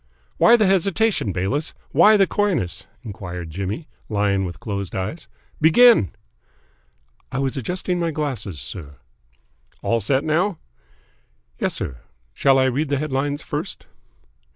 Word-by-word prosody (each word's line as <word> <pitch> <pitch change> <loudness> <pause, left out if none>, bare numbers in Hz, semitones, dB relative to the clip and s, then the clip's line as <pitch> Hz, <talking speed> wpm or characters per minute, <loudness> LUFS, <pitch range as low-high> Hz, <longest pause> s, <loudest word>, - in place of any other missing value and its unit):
"Why 235 - +7
the 215 - +3
hesitation, 195 - +2
Bayliss? 100 - -2 0.2
Why 215 0 +6
the 195 - +5
coyness?" 160 - -1 0.2
enquired 90 -6 -7
Jimmy, 100 - -4 0.2
lying 100 -2 +1
with 85 -1 -7
closed 100 -3 -4
eyes. 105 - -4 0.3
"Begin!" 165 - +6 1.2
"I - - -3
was 135 -1 -1
adjusting 180 - -2
my 170 -1 0
glasses, 130 - -3
sir." 75 -4 -7 0.9
"All 115 - +1
set 130 +6 +1
now?" 170 +4 +1 1.0
"Yes, - - 0
sir. 65 - -4 0.4
Shall 135 -1 +4
I 130 - +4
read 135 +4 0
the 140 - +1
headlines 145 0 -2
first?" - - -5
135 Hz, 130 wpm, -22 LUFS, -, 1.2 s, Why